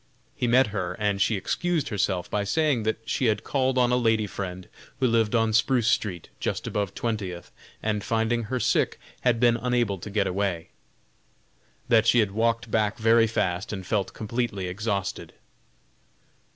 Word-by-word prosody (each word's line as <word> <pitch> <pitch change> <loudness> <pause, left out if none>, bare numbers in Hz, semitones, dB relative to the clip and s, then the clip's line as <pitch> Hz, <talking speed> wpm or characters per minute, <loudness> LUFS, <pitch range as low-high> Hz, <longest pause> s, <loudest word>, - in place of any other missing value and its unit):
He 125 - -1
met 130 +3 +5
her 90 -3 -2
and 100 0 -1
she 110 - +3
excused 165 - -1
herself 95 -3 -1
by 105 -1 -1
saying 145 +3 +1
that 110 +1 -3
she 130 - 0
had 105 -3 +1
called 130 -2 0
on 125 -1 +3
a - - +4
lady 115 -3 +2
friend 95 -2 -6 0.3
who 130 - +2
lived 115 -2 +2
on 115 -1 +2
Spruce 115 0 +3
street, 90 -8 -1
just - - -2
above 100 -2 -2
Twentieth, 100 -7 -4 0.3
and 105 -2 -1
finding 115 +1 0
her 130 +3 -2
sick - - +1 0.2
had 120 -2 +2
been 120 -1 +4
unable 120 -5 0
to 105 - -7
get 100 -1 +1
away; 95 -3 -2 1.2
that 115 -1 +4
she 120 - +5
had 105 -4 +3
walked 115 +2 0
back 105 -2 +1
very 115 0 +4
fast 95 -3 -1
and 95 -3 -5
felt 100 +1 -1
completely 110 -3 -3
exhausted. 100 +1 -3
110 Hz, 165 wpm, -26 LUFS, 100-120 Hz, 1.2 s, met